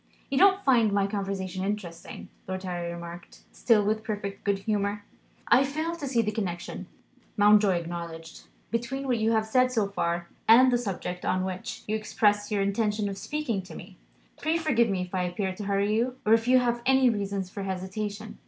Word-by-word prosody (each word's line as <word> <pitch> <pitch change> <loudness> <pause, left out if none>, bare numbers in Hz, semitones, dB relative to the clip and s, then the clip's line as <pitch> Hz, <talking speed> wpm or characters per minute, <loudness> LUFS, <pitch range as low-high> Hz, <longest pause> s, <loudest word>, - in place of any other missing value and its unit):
"You 275 - 0
don't 390 0 +5
find 235 -6 +4
my 200 -1 +2
conversation 195 -2 -3
interesting?" 195 -4 -5 0.2
Lord 185 0 -4
Harry 175 -2 -3
remarked, 170 0 -9
still 215 -4 +3
with 215 +1 0
perfect 205 -2 -5
good 200 -1 +1
humour. 205 0 -2 0.4
"I 265 - +6
fail 310 +5 -2
to 290 -4 -5
see 240 -3 +2
the 215 - -1
connection," 185 -5 -4 0.5
Mountjoy 205 -2 +5
acknowledged, 170 -1 -6 0.3
"between 240 +4 -2
what 250 -3 +1
you 220 +1 +2
have 220 -1 +2
said 255 +3 +3
so 220 -5 +1
far, 170 -3 -2 0.2
and 250 +3 +7
the 245 - +3
subject 180 -5 -4
on 185 0 0
which 185 -1 -5
you 215 - 0
expressed 210 -1 +1
your 205 -2 +1
intention 210 +1 0
of 195 - -6
speaking 295 -10 -2
to 185 - -12
me. 185 +1 -11 0.5
Pray 315 +2 +1
forgive 240 -9 +2
me 190 -2 -1
if 180 - -10
I 185 - 0
appear 185 +2 -2
to 205 +2 -7
hurry 200 +1 +1
you 240 +3 0
or 215 - +5
if 225 +1 +3
you 255 +1 +6
have 240 -1 +1
any 265 -1 +4
reasons 200 -3 -3
for 200 - -6
hesitation." 200 +3 -5
205 Hz, 190 wpm, -27 LUFS, 190-230 Hz, 0.5 s, and